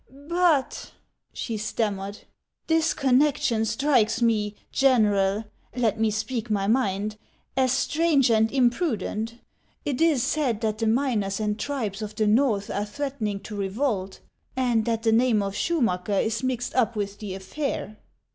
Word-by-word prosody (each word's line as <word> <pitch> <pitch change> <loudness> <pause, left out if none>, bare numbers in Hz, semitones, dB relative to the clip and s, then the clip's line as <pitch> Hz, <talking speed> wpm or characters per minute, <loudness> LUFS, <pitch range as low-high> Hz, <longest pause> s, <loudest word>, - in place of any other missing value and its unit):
" - - -35 0.3
But," 320 -7 +1 0.4
she 225 -3 -4
stammered, 205 -2 -3 0.2
" - - -59
this 325 0 +2
connection 265 -4 +2
strikes 230 0 +2
me, 215 -3 +1 0.2
General, 210 -6 +3 0.2
— - - -38
let 225 -3 +1
me 220 0 +3
speak 220 +2 -3
my 200 -2 0
mind, 210 -2 0 0.2
— - - -38
as 260 -1 +2
strange 285 -1 +2
and 220 0 +3
im 255 -3 +4
prudent. 230 - -2 0.5
It 285 +1 -2
is 310 -7 +3
said 255 -8 0
that 215 -1 -1
the 225 - 0
miners 220 -5 0
and 210 0 -1
tribes 225 -8 -3
of 215 0 -6
the 215 - 0
Xorth 215 -2 +2
are 205 - 0
threatening 215 -3 -3
to 210 - -8
revolt, 200 -1 -2 0.3
and 240 -4 +1
that 225 -1 -1
the 225 - +3
name 225 -2 +3
of 195 0 -3
Schumacker 210 - 0
is 225 +1 -1
mixed 255 -1 -2
up 235 -3 +1
with 205 -1 -3
the 200 -3 -5
affair." 215 +2 -4
225 Hz, 160 wpm, -25 LUFS, 210-260 Hz, 0.5 s, im